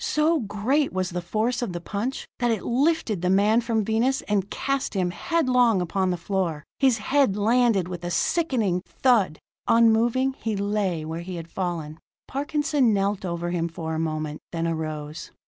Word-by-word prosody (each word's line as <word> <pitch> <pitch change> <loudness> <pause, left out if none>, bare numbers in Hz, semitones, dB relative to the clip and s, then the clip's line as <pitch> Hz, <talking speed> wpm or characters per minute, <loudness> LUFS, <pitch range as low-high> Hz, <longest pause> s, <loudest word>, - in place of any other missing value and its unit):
So 310 +2 +2
great 235 +7 0
was 185 -1 -2
the 180 +1 -3
force 220 +8 -1
of 235 -7 -3
the 175 - -3
punch, 210 +9 -4
that 240 -1 +1
it 220 -4 0
lifted 255 - +1
the 180 - +1
man 205 +5 +4
from 225 -3 0
Venus 235 +5 +1
and 205 -2 -1
cast 275 -5 -2
him 180 -2 +1
headlong 250 - +2
upon 185 +2 0
the 180 - 0
floor. 170 -4 -2 0.2
His 260 -4 +4
head 265 -8 +2
landed 225 -3 +3
with 175 -1 -6
a 175 - -2
sickening 220 - +1
thud. 220 -11 +2 0.3
Unmoving, 235 +3 +4
he 220 -2 -2
lay 200 -5 -1
where 160 +2 -4
he 180 +1 -6
had 165 -1 -8
fallen. 165 -4 -4 0.3
Parkinson 290 -4 +1
knelt 195 0 0
over 175 -1 -3
him 170 -1 0
for 160 -1 -5
a 160 - -2
moment, 155 -2 -3
then 165 -1 -1
arose. 155 -2 -4
205 Hz, 175 wpm, -25 LUFS, 175-245 Hz, 0.3 s, man